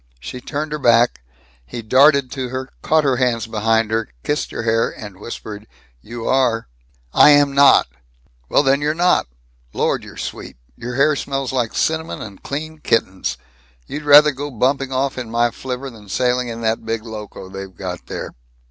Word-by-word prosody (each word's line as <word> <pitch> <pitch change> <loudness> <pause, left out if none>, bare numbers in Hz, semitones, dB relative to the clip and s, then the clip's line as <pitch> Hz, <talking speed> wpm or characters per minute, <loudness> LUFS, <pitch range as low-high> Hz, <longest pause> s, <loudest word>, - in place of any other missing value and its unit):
She 125 - -8
turned 150 +3 -4
her 150 - -3
back. 120 - +3 0.4
He 90 - -8
darted 135 +3 +4
to 130 -2 -4
her, 130 +1 -5
caught 155 0 +2
her 135 -3 +2
hands 120 -3 +1
behind 110 0 +1
her, 110 0 -1
kissed 145 0 -1
her - - -5
hair, 115 0 +2
and 100 -3 -10
whispered, 105 -1 -8 0.3
"You 115 - -7
are!" 125 -4 +1 0.5
"I - - +7
am 145 -1 +5
not!" 140 0 +6 0.6
"Well - - +4
then, 135 +1 +2
you're 150 +1 0
not. 175 - +2 0.5
Lord, - - 0
you're - - -12
sweet! - - -7 0.2
Your 120 - -6
hair 150 +3 +3
smells 135 -2 -3
like 120 -4 -1
cinnamon 160 0 -1
and 100 -3 -9
clean 155 +2 -5
kittens. 95 - 0 0.5
You'd 150 - -6
rather 150 0 +7
go 145 +2 -5
bumping 135 +2 0
off 130 0 -1
in 120 -3 -6
my 120 +1 +1
flivver 130 +2 -6
than 105 -3 -15
sailing 125 +2 +1
in 115 0 -6
that 110 0 -1
big 115 -1 -3
Loco 105 -4 -8
they've 95 -1 -8
got 90 -1 -6
there." - - -5
125 Hz, 175 wpm, -20 LUFS, 110-140 Hz, 0.6 s, I